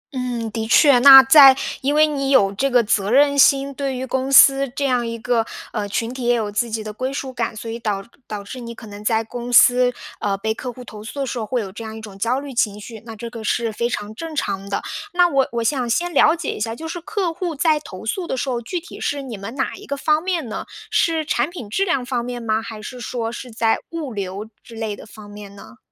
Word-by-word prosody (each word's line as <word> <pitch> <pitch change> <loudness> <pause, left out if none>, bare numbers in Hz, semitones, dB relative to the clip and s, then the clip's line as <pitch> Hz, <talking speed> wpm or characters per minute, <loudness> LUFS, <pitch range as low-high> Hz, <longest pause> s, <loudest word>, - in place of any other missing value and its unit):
嗯， 240 -3 -3
的 220 +1 -3
确。 270 +2 +6
那 270 +1 +11
在 270 0 +8 0.3
因 285 +2 0
为 305 +1 +6
你 280 -3 -2
有 200 -8 +4
这 270 +7 0
个 245 -2 +4
责 205 -2 0
任 285 +2 +4
心， 275 0 +4
对 275 -1 -3
于 255 - -4
公 265 +1 -2
司 275 0 +7
这 285 - -1
样 250 -3 +1
一 230 0 -4
个， 230 0 0 0.3
呃， 210 -3 -3
群 230 +4 -2
体 260 - -7
也 245 0 +3
有 215 -3 -2
自 230 +3 -1
己 220 0 -3
的 215 0 -7
归 255 +5 -3
属 270 -1 -5
感， 230 -2 -3
所 225 +1 -7
以 230 - -5
导 210 -4 -2 0.2
导 210 -1 -6
致 225 +6 -8
你 235 -1 -8
可 230 - -11
能 205 0 -10
在 225 +1 +1
公 240 +2 -7
司， 245 0 +6 0.3
呃， 200 -1 -1
被 220 +2 -2
客 250 +2 -6
户 250 +1 -11
投 210 -2 -10
诉 220 +6 -8
的 - - 0
时 250 -1 -4
候， 220 - -3
会 250 0 -1
有 195 -3 -7
这 210 +4 -9
样 220 0 -7
一 - - -7
种 210 -3 -10
焦 235 +5 0
虑 280 -1 -8
情 210 -4 0
绪 220 +1 -9
那 225 -1 -8
这 235 +2 -7
个 230 -2 -8
是 230 +1 0
非 235 +3 -1
常 210 -2 -4
正 320 +6 -7
常 200 -7 -3
的。 200 - -2 0.3
那 355 0 +5
我 275 -5 +1
我 235 -1 -2
想 250 0 0
先 345 +9 0
了 330 - +5
解 340 - -4
一 - - -8
下， 225 +1 -2
就 320 +6 -7
是 345 +1 -6
客 390 -2 -2
户 345 -1 -4
在 305 +1 +2
投 185 -10 -10
诉 345 - -2
的 265 - -3
时 265 - -2
候， 240 -2 -2
具 345 +10 -4
体 335 - -12
是 285 -1 -2
你 250 -4 -7
们 200 +5 -8
哪 265 - -2
一 - - -11
个 280 - -3
方 305 +2 +1
面 350 -6 -2
呢？ 220 - -5 0.3
是 325 -2 +1
产 300 - 0
品 340 - -8
质 390 - +1
量 275 -9 0
方 245 -2 -2
面 245 0 -5
吗， 220 -1 0
还 225 -1 -8
是 245 +4 -8
说 230 -1 -3
是 250 +1 -8
在 225 -1 +1
物 315 -7 -5
流 200 +1 -5 0.2
之 230 - -13
类 220 -2 -3
的 - - -13
方 215 -1 -13
面 205 -1 -11
呢？ 215 +4 -14
245 Hz, 285 characters per minute, -21 LUFS, 220-275 Hz, 0.3 s, 那